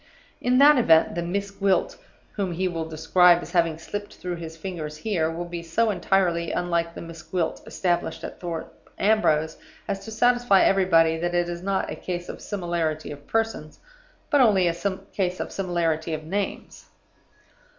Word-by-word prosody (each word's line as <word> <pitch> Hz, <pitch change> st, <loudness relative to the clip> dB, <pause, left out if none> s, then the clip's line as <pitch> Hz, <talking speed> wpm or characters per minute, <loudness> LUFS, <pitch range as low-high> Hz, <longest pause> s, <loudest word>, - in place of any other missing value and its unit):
In 250 Hz, +1 st, +2 dB
that 285 Hz, 0 st, +7 dB
event, 160 Hz, -8 st, +4 dB
the 170 Hz, -, -2 dB
'Miss 200 Hz, +4 st, -3 dB
Gwilt' 195 Hz, -2 st, 0 dB, 0.3 s
whom 195 Hz, -4 st, -2 dB
he 185 Hz, +3 st, 0 dB
will 165 Hz, -2 st, -4 dB
describe 170 Hz, +2 st, +4 dB
as -, -, -9 dB
having 170 Hz, -3 st, +2 dB
slipped 205 Hz, +5 st, -7 dB
through 180 Hz, -1 st, -5 dB
his 165 Hz, -1 st, -8 dB
fingers 160 Hz, -4 st, -6 dB
here 165 Hz, -3 st, 0 dB
will 170 Hz, +2 st, -4 dB
be 175 Hz, 0 st, -6 dB
so 215 Hz, +7 st, +1 dB
entirely 175 Hz, -3 st, +1 dB
unlike 170 Hz, -1 st, -1 dB
the -, -, -7 dB
'Miss 165 Hz, -1 st, -9 dB
Gwilt' 160 Hz, +1 st, -2 dB
established 175 Hz, -2 st, -1 dB
at -, -, -7 dB
Thorpe 170 Hz, -2 st, -7 dB
Ambrose, 160 Hz, -7 st, +2 dB, 0.3 s
as 195 Hz, -, -3 dB
to -, -, -7 dB
satisfy 240 Hz, -3 st, +4 dB
everybody 165 Hz, -4 st, +4 dB
that 175 Hz, +1 st, -1 dB
it 175 Hz, 0 st, +2 dB
is 175 Hz, 0 st, -5 dB
not 195 Hz, +1 st, -1 dB
a -, -, -4 dB
case 175 Hz, -1 st, -5 dB
of -, -, -7 dB
similarity 170 Hz, -5 st, -2 dB
of 145 Hz, 0 st, -11 dB
persons, 225 Hz, -9 st, -2 dB, 0.5 s
but 290 Hz, -3 st, +5 dB
only 200 Hz, -7 st, +4 dB
a 170 Hz, -, +1 dB, 0.4 s
case 185 Hz, -2 st, -1 dB
of -, -, -4 dB
similarity 170 Hz, -4 st, -1 dB
of 155 Hz, -, -7 dB
names. 195 Hz, +5 st, -4 dB
175 Hz, 170 wpm, -25 LUFS, 165-195 Hz, 0.5 s, that